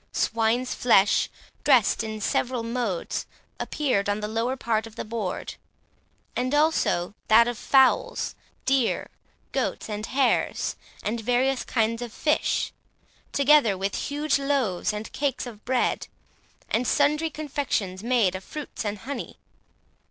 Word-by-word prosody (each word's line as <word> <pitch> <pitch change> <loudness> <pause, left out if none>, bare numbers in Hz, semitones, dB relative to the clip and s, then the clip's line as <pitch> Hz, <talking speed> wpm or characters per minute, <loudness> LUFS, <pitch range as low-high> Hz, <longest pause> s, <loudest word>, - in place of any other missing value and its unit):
Swine's 230 +2 +1
flesh, 205 -5 +4 0.3
dressed 250 -6 +4
in 220 -1 -5
several 245 +2 0
modes, 230 -6 -2 0.3
appeared 250 -10 0
on 205 +1 0
the 210 - -3
lower 230 +4 -1
part 225 -3 0
of 225 - -14
the - - -5
board, 215 -4 -4 0.8
as 255 +1 0
also 295 - +2
that 230 +2 +7
of 240 - -1
fowls, 265 +3 +3 0.3
deer, 265 -3 +1 0.4
goats, - - -2
and 215 0 -4
hares, 270 0 +1 0.3
and 225 +2 -2
various 250 +3 +1
kinds 230 0 0
of 240 -2 -5
fish, 300 +6 0 0.6
together 280 -8 +5
with 195 +1 -2
huge 290 0 0
loaves 265 -9 0
and 210 +1 -6
cakes 275 -3 -1
of 220 -4 -10
bread, 255 0 0 0.6
and 240 +2 0
sundry 300 +2 +2
confections 280 -11 -2
made 230 -5 +2
of 185 0 -6
fruits 300 +1 -6
and 210 -1 -2
honey. 280 +4 -6
235 Hz, 130 wpm, -26 LUFS, 215-270 Hz, 0.8 s, that